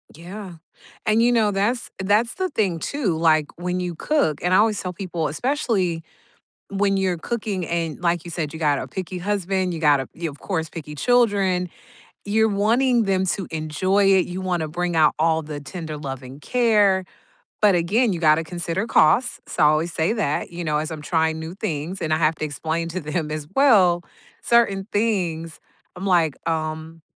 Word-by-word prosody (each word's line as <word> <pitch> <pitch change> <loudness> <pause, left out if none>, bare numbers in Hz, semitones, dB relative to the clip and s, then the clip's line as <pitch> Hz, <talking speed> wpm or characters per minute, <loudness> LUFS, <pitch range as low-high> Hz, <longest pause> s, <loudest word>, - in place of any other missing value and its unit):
Yeah, 185 +4 -9 0.5
and, 220 0 +3
you 240 +1 +4
know, 220 -3 +3
that's 210 +5 -1
that's 210 +5 +2
the 375 0 -1
thing 190 - 0
too, 220 - -1
like, 155 -2 +3
when 180 +1 -2
you 180 -2 -3
cook 220 - 0
and 180 +1 +1
I - - +6
always 215 -1 +2
tell 180 -1 -4
people, 170 -3 -3
especially 185 - -1 0.7
when 195 0 +1
you're 185 -2 0
cooking 200 -2 -3
and, 165 -3 -2
like 170 -1 0
you 170 - -7
said, 155 -3 -3
you 160 - -7
got 145 -3 +2
a - - -5
picky 185 -1 -5
husband, 190 -1 -1
you 165 - -4
got 150 -3 +4
a 135 - -4
you 165 -1 -4
of 145 - -12
course, 160 -5 -3
picky 150 -3 -8
children. 200 - +2 0.5
You're 220 +2 +2
wanting 230 +4 +2
them 190 -2 +1
to 190 0 -2
enjoy 160 +6 +1
it, 185 - +3
you 180 +1 -5
want 180 -3 -1
to 155 - -2
bring 175 +1 -2
out 155 -2 +4
all 160 0 +2
the 150 -1 -6
tender 155 +1 -7
love 135 -3 -6
and 130 +3 -11
care. 210 -6 +3 0.6
But 205 -3 +5
again, 205 +8 +2
you 170 - -4
got 155 -2 +5
to 165 - -2
consider 175 +5 -3
costs, 235 +5 +3
so - - -3
I - - +7
always 155 +3 +1
say 160 +7 +1
that, 175 -11 -1
you 175 0 -5
know? 150 -2 0
As 155 +1 -3
I'm 155 -2 -6
trying 160 -1 +1
new 160 +1 -6
things, 180 -2 -4
and 160 -2 -2
I - - +2
have 155 0 +2
to 155 - -3
explain 160 +3 -3
to 180 +3 -3
them 150 0 -3
as 155 -1 -4
well 195 -11 +5 0.4
certain 205 -5 +2
things, 175 -7 -1 0.4
I'm 180 +2 -6
like, 170 -5 +3 0.2
"Um, 160 0 -4
175 Hz, 195 wpm, -22 LUFS, 160-205 Hz, 0.7 s, I